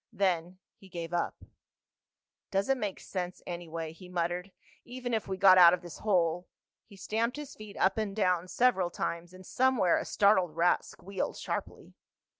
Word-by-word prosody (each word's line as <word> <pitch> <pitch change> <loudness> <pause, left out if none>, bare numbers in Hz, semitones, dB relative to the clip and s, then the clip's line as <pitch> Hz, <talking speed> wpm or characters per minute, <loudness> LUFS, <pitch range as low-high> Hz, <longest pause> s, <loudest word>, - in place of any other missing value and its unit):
Then 185 -4 0 0.2
he 195 - -17
gave 170 -1 -6
up. 175 - -2 1.1
"Doesn't 200 +8 +1
make 205 -4 -2
any - - -14
sense, 180 -1 -5
anyway," 165 -2 -5
he 180 +2 -13
muttered. 180 +2 -2 0.3
"Even 245 0 -5
if 220 - -1
we 190 -1 -3
got 185 -1 +7
out 175 0 +9
of 180 - -16
this 175 -3 -9
hole—" 180 -4 +1 0.4
He 205 - -15
stamped 225 +6 -2
his 295 -1 -7
feet 215 -2 -11
up 190 +3 +2
and 205 -3 -2
down 180 -4 +1
several 190 -4 +2
times, 170 0 -4
and 185 0 -13
somewhere 250 -8 +2
a - - -5
startled 185 -6 +3
rat 175 +1 +3
squealed 195 +2 -5
sharply. - - -5
185 Hz, 170 wpm, -30 LUFS, 175-210 Hz, 1.1 s, out